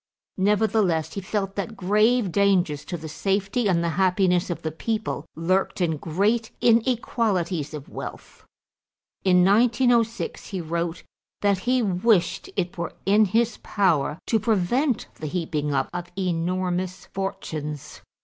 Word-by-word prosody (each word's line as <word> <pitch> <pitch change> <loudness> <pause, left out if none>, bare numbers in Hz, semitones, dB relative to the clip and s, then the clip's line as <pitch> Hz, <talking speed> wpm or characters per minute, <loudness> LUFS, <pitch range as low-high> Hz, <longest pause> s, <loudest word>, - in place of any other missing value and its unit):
Nevertheless 200 -5 +2
he 200 - -4
felt 195 0 -2
that 205 +2 -4
grave 210 +3 +2
dangers 185 -6 +2
to 175 - -4
the 160 0 -8
safety 195 +7 0
and 170 -2 +2
the 170 - +1
happiness 185 -1 +2
of 175 - -4
the 160 - -2
people 215 -2 -3
lurked 185 +5 0
in 165 -4 +1
great 205 +9 0
inequalities 220 - +1
of 145 -2 -8
wealth. - - -9 0.8
In 180 -1 +5
1906 235 +2 +2
he 195 - -4
wrote 170 0 -3 0.4
that 200 -2 +2
he 255 -1 +3
wished 190 -1 +1
it 180 -2 -2
were 170 - -3
in 210 +3 +5
his 225 +3 +1
power 160 -7 +1
to 225 - +2
prevent 230 - +1
the 155 - -4
heaping 150 -3 -2
up 135 -1 +1
of 175 0 -4
enormous 185 +1 -1
fortunes. 155 -6 -5
190 Hz, 135 wpm, -24 LUFS, 170-215 Hz, 0.8 s, In